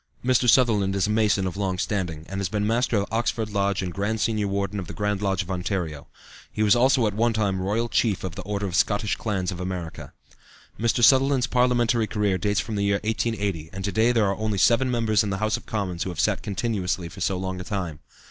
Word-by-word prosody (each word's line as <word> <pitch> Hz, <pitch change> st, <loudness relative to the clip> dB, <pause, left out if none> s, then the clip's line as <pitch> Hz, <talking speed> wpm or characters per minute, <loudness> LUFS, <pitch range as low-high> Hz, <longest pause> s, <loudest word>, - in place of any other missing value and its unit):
Mr. 125 Hz, -1 st, +3 dB
Sutherland 105 Hz, -6 st, +3 dB
is 100 Hz, -, +1 dB
a 105 Hz, -, -1 dB
Mason 105 Hz, -3 st, +2 dB
of 90 Hz, -, -3 dB
long 95 Hz, -2 st, -1 dB
standing, 90 Hz, -5 st, -2 dB
and 95 Hz, +1 st, -5 dB
has 95 Hz, -3 st, -1 dB
been 105 Hz, +1 st, -1 dB
Master 115 Hz, +1 st, +1 dB
of 100 Hz, -, +1 dB
Oxford 110 Hz, -1 st, -1 dB
Lodge 100 Hz, -1 st, 0 dB
and 90 Hz, -1 st, -4 dB
Grand 105 Hz, +4 st, -1 dB
Senior 105 Hz, -2 st, 0 dB
Warden 100 Hz, 0 st, -2 dB
of 90 Hz, -, -6 dB
the -, -, -8 dB
Grand 105 Hz, -1 st, -1 dB
Lodge 95 Hz, -3 st, 0 dB
of 90 Hz, -, -8 dB
Ontario. 90 Hz, -5 st, -3 dB, 0.4 s
He 110 Hz, -, -1 dB
was 105 Hz, +1 st, +5 dB
also 125 Hz, 0 st, +3 dB
at 105 Hz, -, 0 dB
one 115 Hz, +2 st, +1 dB
time 100 Hz, -4 st, 0 dB
Royal 105 Hz, +5 st, 0 dB
Chief 110 Hz, -4 st, 0 dB
of 95 Hz, -3 st, -4 dB
the 95 Hz, -, -6 dB
Order 100 Hz, +1 st, -3 dB
of 95 Hz, -, -4 dB
Scottish 105 Hz, +4 st, +1 dB
Clans 95 Hz, -5 st, -2 dB
of 90 Hz, -, -7 dB
America. 90 Hz, -3 st, -5 dB, 0.7 s
Mr. 115 Hz, +1 st, +1 dB
Sutherland's 135 Hz, 0 st, +5 dB
parliamentary 120 Hz, -3 st, +2 dB
career 105 Hz, -3 st, 0 dB
dates 105 Hz, +2 st, +1 dB
from 110 Hz, -, -4 dB
the 100 Hz, -, 0 dB
year 100 Hz, 0 st, +1 dB
1880, 105 Hz, -7 st, -2 dB
and 95 Hz, 0 st, -5 dB
to 100 Hz, -, -1 dB
day 110 Hz, +5 st, +3 dB
there 115 Hz, -3 st, +2 dB
are 100 Hz, 0 st, 0 dB
only 110 Hz, -2 st, -1 dB
seven 120 Hz, +6 st, +3 dB
members 115 Hz, -4 st, +2 dB
in 105 Hz, -, -2 dB
the 95 Hz, -, -2 dB
House 110 Hz, +1 st, 0 dB
of 120 Hz, -, -8 dB
Commons 95 Hz, -5 st, -3 dB
who -, -, -1 dB
have 85 Hz, -4 st, -6 dB
sat -, -, +1 dB
continuously 95 Hz, -3 st, -2 dB
for 85 Hz, -, -11 dB
so 95 Hz, -1 st, 0 dB
long 95 Hz, 0 st, -4 dB
a -, -, -5 dB
time. 90 Hz, -6 st, -4 dB
100 Hz, 235 wpm, -24 LUFS, 95-110 Hz, 0.7 s, was